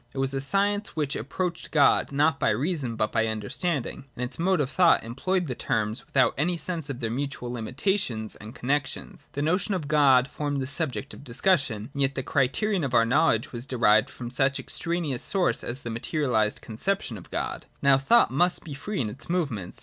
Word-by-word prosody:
It - - -7
was 135 0 0
a 135 - -1
science 200 +6 0
which 145 -3 -1
approached 170 - -3
God 145 -2 +4
not 150 +3 +2
by - - +2
reason 130 - -1
but 110 - 0
by 115 - +1
understanding, 115 - -2
and, 140 - -12
in 125 - -4
its 125 - -5
mode 185 +1 +2
of 140 -1 0
thought, 180 -2 +4
employed 175 +11 -1
the 130 - -3
terms 110 -1 -1
vi?ithout 130 -2 +4
any 175 +4 +1
sense 165 -4 -3
of 135 -2 -5
their 115 -1 -1
mutual 130 -1 -3
limi 120 0 -5
tations 130 - -1
and 110 +5 -10
connexions. 135 +1 -3
The 145 - -2
notion 185 +6 +1
of 160 -6 -4
God 140 -4 +5
formed 145 -1 -3
the 130 - -2
subject 140 -3 -2
of - - -11
discussion; 130 - 0
and 140 - -3
yet 135 0 +1
the 130 - -2
criterion 160 - +1
of 130 -3 -1
our 115 -1 +5
know 150 +8 +3
ledge 115 0 +1
was 120 +2 -6
derived 115 -2 +4
from 120 -2 -7
such 135 +1 +2
an - - -6
extraneous 165 -7 -2
source 190 -3 +1
as 125 +3 -4
the 120 - -4
materialised 115 -3 0
conception 125 - -2
of 95 - -11
God. - - -3 0.2
Now 140 -1 +6
thought 235 +13 +4
must 175 +7 +1
be 155 - -7
free 195 +9 -3
in 115 - -1
its 135 +9 -11
movements. 135 - -2
140 Hz, 210 wpm, -26 LUFS, 120-165 Hz, 0.2 s, Now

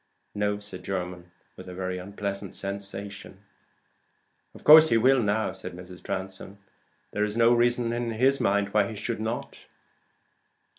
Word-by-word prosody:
"No," 105 0 0
said 100 -3 -10
Jermyn, 90 -2 -5 0.3
with - - -11
a 90 - -8
very 95 0 -3
unpleasant 100 0 -5
sensation. 100 0 -6 1.1
"Of - - -14
course 155 +1 +9
he 115 - +4
will 130 +3 +4
now," 105 +1 0
said - - -7
Mrs. 90 0 -11
Transome. 95 +1 -6 0.5
"There 105 - -1
is 105 +1 -2
no 115 +1 +5
reason 120 0 +2
in 120 0 -2
his 130 +5 +2
mind 100 0 +1
why 105 -1 +2
he 110 - -7
should 110 +2 -3
not." 110 +2 -5
100 Hz, 150 wpm, -26 LUFS, 95-115 Hz, 1.1 s, course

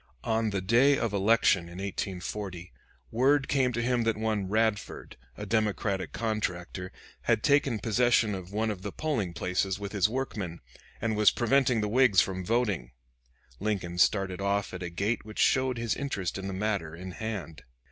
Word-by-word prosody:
On 110 -1 +1
the 100 -2 -2
day 120 +8 +4
of 115 -3 -1
election 100 -3 +3
in 85 +1 -10
1840, 95 -1 -5 0.4
word 135 +4 +3
came 130 -3 +2
to 120 0 -2
him 125 0 +1
that 115 -2 0
one 110 -3 -1
Radford, 110 0 -1 0.2
a - - -5
Democratic 105 -3 0
contractor, 95 -5 -3 0.3
had - - +2
taken 140 -4 +3
possession 115 0 +2
of 95 -1 -6
one 110 +1 0
of 95 -3 -6
the 100 0 -5
polling 125 - -2
places 90 +3 -1
with 100 -1 -5
his 100 -1 +2
workmen, 105 -9 -4 0.4
and 110 0 -1
was 105 0 +6
preventing 125 -1 +2
the 105 - 0
Whigs 115 -3 +4
from 95 -1 0
voting. 105 - 0 0.7
Lincoln 95 -4 -2
started 95 -1 +2
off 100 0 0
at 90 - -6
a 90 - -3
gait 100 +6 -1
which 110 0 -11
showed 130 -2 +2
his 115 -1 -1
interest 100 -11 -3
in 95 - -5
the - - -3
matter 95 -5 -2
in 90 +2 -7
hand. 100 -6 -5
105 Hz, 170 wpm, -28 LUFS, 95-115 Hz, 0.7 s, was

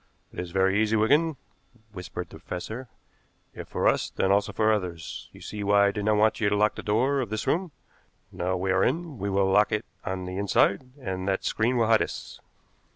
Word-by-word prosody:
"It - - -7
is 90 -1 -4
very 95 +3 +2
easy, 110 0 +2
Wigan," 145 +8 +3 0.6
whispered 90 -3 -7
the - - -11
professor; 110 +8 -6 0.7
"if - - -8
for - - 0
us, - - +2
then 95 - 0
also 100 +1 +2
for 110 +1 +2
others. 90 -5 -4
You - - -15
see 105 -1 -6
why 100 0 +4
I 100 - +3
did 105 0 -4
not 110 0 +3
want 110 +1 +3
you 105 -3 +2
to 100 - +1
lock 105 +1 +3
the - - -7
door 125 +7 +1
of 120 - -4
this 110 0 -3
room? 180 +3 0 0.6
Now 90 +1 -2
we 95 +1 -1
are 95 +1 +3
in, 155 -2 -1
we 100 +1 -2
will 95 0 +2
lock 105 +2 +4
it 105 +1 -1 0.2
on 95 -1 -4
the 90 +1 -5
inside, 100 +4 +2
and 95 -6 -4
that 95 - 0
screen 120 +3 +1
will 115 - +3
hide 110 0 +4
us." - - -5
105 Hz, 220 wpm, -26 LUFS, 95-110 Hz, 0.7 s, why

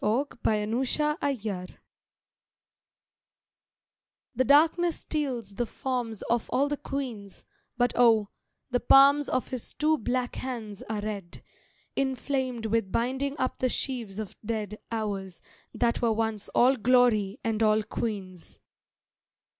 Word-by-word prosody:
FIRELIGHT 245 +4 0
AND 210 0 +1
NIGHTFALL 255 - -1 2.7
THE 260 - +3
darkness 320 +5 +4
steals 255 -9 -2
the 240 +4 -2
forms 240 -3 -3
of 235 -1 -1
all 275 +2 +2
the 290 0 -2
queens, 245 -9 -6 0.3
But 245 0 +2
oh, 225 -4 +4 0.4
the 245 - +2
palms 280 +3 +6
of 255 - -1
his 255 -3 -2
two 310 0 +2
black 245 +2 -2
hands 225 -6 -5
are 215 -1 -2
red, 200 -4 -6 0.5
Inflamed 260 -3 -1
with 220 -3 0
binding 265 +4 -1
up 255 - -2
the 255 - +1
sheaves 235 -7 -2
of 215 -3 -6
dead 215 -1 -3
Hours 200 -5 -4 0.3
that 235 -1 0
were 230 -2 +3
once 220 -2 -1
all 260 +2 +4
glory 230 -3 +3
and 225 -1 -1
all 215 0 +3
queens. 195 -5 -5
235 Hz, 120 wpm, -28 LUFS, 215-265 Hz, 2.7 s, palms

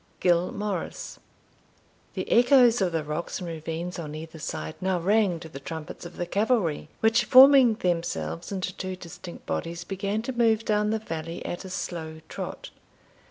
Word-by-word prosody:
Gil 175 0 +2
Morrice. 205 - -4 1.0
The - - -3
echoes 245 -1 +6
of 185 -2 +2
the 165 -2 -1
rocks 150 +3 -4
and 180 - -6
ravines, 165 +2 -5
on 150 -2 -6
either 160 +1 -8
side, 80 - -4
now 185 -1 +1
rang 195 -1 +2
to 165 - -8
the 135 -3 -9
trumpets 160 +3 -7
of - - -14
the 175 - -2
cavalry, 195 - 0
which, 225 +1 +4
forming 260 -3 +8
themselves 165 - -2
into 185 -1 -3
two 185 0 -4
distinct 175 0 -10
bodies, 170 0 -3
began 200 +3 -2
to 260 - -3
move 225 -2 +2
down 210 0 +2
the 220 - +1
valley 165 -5 -6
at 175 - -5
a - - -7
slow 160 -3 -5
trot. - - -6
180 Hz, 165 wpm, -26 LUFS, 165-215 Hz, 1.0 s, forming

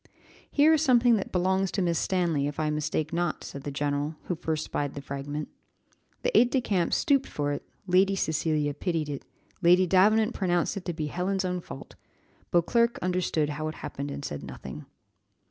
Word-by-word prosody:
"Here 300 +2 +5
is 310 - +3
something 245 -5 +5
that 195 - -4
belongs 190 +1 +1
to 200 - 0
Miss 170 -2 +1
Stanley, 170 -6 +1
if 145 - -5
I 155 -1 +1
mistake 150 +1 -2
not," 175 -1 -1
said 140 - -7
the 145 - -5
general, 145 +2 -1
who - - -2
first 155 -1 -2
spied 145 -1 -3
the - - -4
fragment. 140 +2 -4 0.8
The - - 0
aid 245 - +6
de 265 - +2
camp 190 -8 0
stooped 275 -2 +2
for 145 -1 -2
it 145 - -5 0.2
Lady 190 +1 +3
Cecilia 155 -4 0
pitied 160 0 -2
it 140 -2 -5 0.4
Lady 180 +1 +6
Davenant 215 +5 +4
pronounced 175 -1 0
it 195 - -6
to 175 - -2
be 155 -1 -3
Helen's 185 +5 -1
own 180 -1 -2
fault 135 - -10 0.6
Beauclerc 235 +7 +2
understood 180 -4 0
how 155 +1 -3
it 155 - -5
happened, 140 +1 -6
and 140 0 -5
said 75 - -5
nothing. - - -9
175 Hz, 185 wpm, -27 LUFS, 150-195 Hz, 0.8 s, aid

